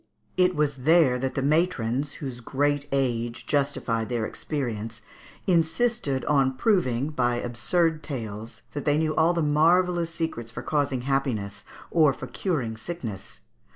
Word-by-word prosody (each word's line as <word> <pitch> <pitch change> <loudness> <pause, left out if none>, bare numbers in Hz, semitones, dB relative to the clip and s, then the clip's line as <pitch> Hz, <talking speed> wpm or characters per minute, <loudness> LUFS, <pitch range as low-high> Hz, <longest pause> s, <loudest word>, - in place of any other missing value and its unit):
It 180 0 +3
was 150 -2 +1
there 140 -2 +4
that 130 +1 -2
the 135 - 0
matrons, 145 -4 +1
whose 130 -4 -6
great 145 +3 0
age 120 -3 -1
justified 135 -6 0
their 120 -3 -1
experience, 115 -6 -4 0.4
insisted 170 - +1
on 135 -3 +2
proving, 140 - +2
by 125 -4 +1
absurd 155 +8 0
tales, 115 -7 -6
that 145 - -3
they 145 0 +3
knew 155 0 +1
all 165 +2 +3
the 170 - +1
marvellous 170 +3 +3
secrets 160 -9 -4
for 115 - -7
causing 140 -4 0
happiness 120 -7 -1 0.3
or 155 -5 +5
for - - -7
curing 125 - -2
sickness. 115 - -6
140 Hz, 140 wpm, -26 LUFS, 120-160 Hz, 0.4 s, or